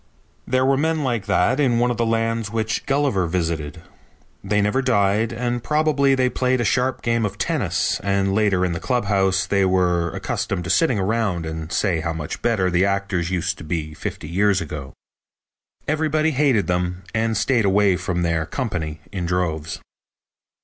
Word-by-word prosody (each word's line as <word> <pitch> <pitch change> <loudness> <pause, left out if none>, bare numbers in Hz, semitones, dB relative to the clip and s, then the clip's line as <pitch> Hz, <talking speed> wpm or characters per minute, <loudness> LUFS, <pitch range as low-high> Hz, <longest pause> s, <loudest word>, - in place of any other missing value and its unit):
There 130 +1 +2
were 135 0 +3
men 160 +1 0
like 120 -6 -2
that 125 +10 +2
in 125 -5 +3
one 120 +1 +2
of 120 - -3
the 115 - +1
lands 115 -1 0
which 110 0 -2
Gulliver 135 -10 +1
visited. 80 -2 -3 0.6
They 105 +1 +1
never 105 +6 +1
died 110 -3 +2
and 120 0 -2
probably 150 -1 +2
they 130 -1 +2
played 130 0 0
a - - +1
sharp 130 +1 0
game 115 -1 +1
of 105 - -3
tennis - - 0
and 100 -1 +1
later 100 -3 +2
in 90 - -1
the 85 - -3
clubhouse 100 -5 +1
they 100 0 +1
were 90 -2 +2
accustomed 90 - -3
to 90 - -2
sit 165 - +3
around 105 -5 0
and 80 0 -6
say 90 -6 +1
how 85 +1 -2
much 80 -2 -5
better 100 -6 +1
the 90 +1 +3
actors 100 -3 0
used 90 -2 -2
to - - -8
be 75 -1 -3
fifty 75 - -6
years 95 +4 +2
ago. 75 -6 -6 0.9
Everybody 155 +1 +1
hated 135 -7 +2
them 90 0 -2
and 110 0 0
stayed 115 +2 +2
away 100 -1 +3
from 90 -1 -2
their 85 -2 0
company 80 - -4
in 90 -3 -3
droves. 85 -3 -2
100 Hz, 175 wpm, -22 LUFS, 90-120 Hz, 0.9 s, were